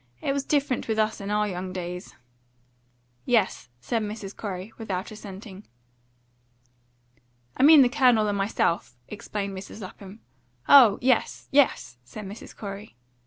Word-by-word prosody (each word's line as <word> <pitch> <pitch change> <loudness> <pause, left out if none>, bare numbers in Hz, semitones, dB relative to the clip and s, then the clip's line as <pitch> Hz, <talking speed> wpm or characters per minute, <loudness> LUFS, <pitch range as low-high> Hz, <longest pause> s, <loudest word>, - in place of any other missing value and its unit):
It 275 - -1
was 280 -1 -1
different 280 -3 0
with 220 -1 -1
us 215 -1 0
in 200 - -5
our 210 0 +1
young 185 -1 -5
days." 180 0 -6 1.1
"Yes," 215 - +1
said 225 - -2
Mrs. 210 -2 -6
Corey, 195 0 -6
without 200 -2 -4
assenting. 200 -1 -10 1.9
"I - - -2
mean 295 0 +8
the - - +4
Colonel 245 -5 +3
and 205 - 0
myself," 195 - -1
explained 200 -1 -5
Mrs. 190 +3 -9
Lapham. 195 +2 -11 0.5
"Oh 240 -8 +8
yes 255 -2 +1
yes!" 130 - +2
said 200 - -9
Mrs. 200 +3 -10
Corey. 200 - -8
210 Hz, 135 wpm, -25 LUFS, 190-230 Hz, 1.9 s, mean